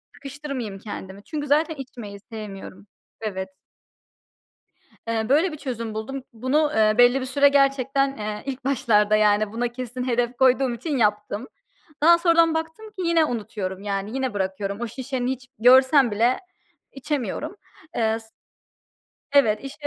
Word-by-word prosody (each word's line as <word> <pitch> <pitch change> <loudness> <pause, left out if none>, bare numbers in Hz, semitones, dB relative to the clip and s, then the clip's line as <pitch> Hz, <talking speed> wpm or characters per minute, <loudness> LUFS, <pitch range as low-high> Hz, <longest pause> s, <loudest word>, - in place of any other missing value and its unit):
sıkıştırmayayım 275 -7 -6
kendimi. 200 -1 -8
Çünkü 295 +2 -5
zaten 310 +3 +2
içmeyi 240 -7 -9
sevmiyorum. 200 -2 -9 0.3
Evet. 190 -3 -4 1.6
Eee, 225 0 -1
böyle 315 +6 +3
bir 305 - -6
çözüm 230 -6 -5
buldum. 260 +5 -5
Bunu, 265 +7 +1
eee, 215 -1 +4
belli 245 +2 +6
bir 260 - -4
süre 280 +2 +4
gerçekten, 275 0 +2
eee, 210 0 -5
ilk 270 -1 -5
başlarda, 215 -6 +3
yani, 210 0 +3
buna 240 +1 -1
kesin 250 +1 -5
hedef 240 0 0
koyduğum 260 -1 +3
için 290 +4 -3
yaptım. 210 +1 0 0.6
Daha 340 +2 +7
sonradan 335 -1 +4
baktım 320 +7 -4
ki 375 -3 -6
yine 335 -1 +4
unutuyorum, 210 -7 -4
yani, 200 +2 -3
yine 260 -4 -2
bırakıyorum. 195 +1 -3
O 240 - -2
şişe 260 +3 -5
hiç 255 0 -3
görsem 260 +2 +6
bile 230 +5 +2 0.5
içemiyorum. 285 - -3 0.4
Eee, 225 -1 +1
s 225 - -12 1.1
evet, 225 -7 +4
işte. 290 +2 -6
245 Hz, 140 wpm, -24 LUFS, 215-275 Hz, 1.6 s, Daha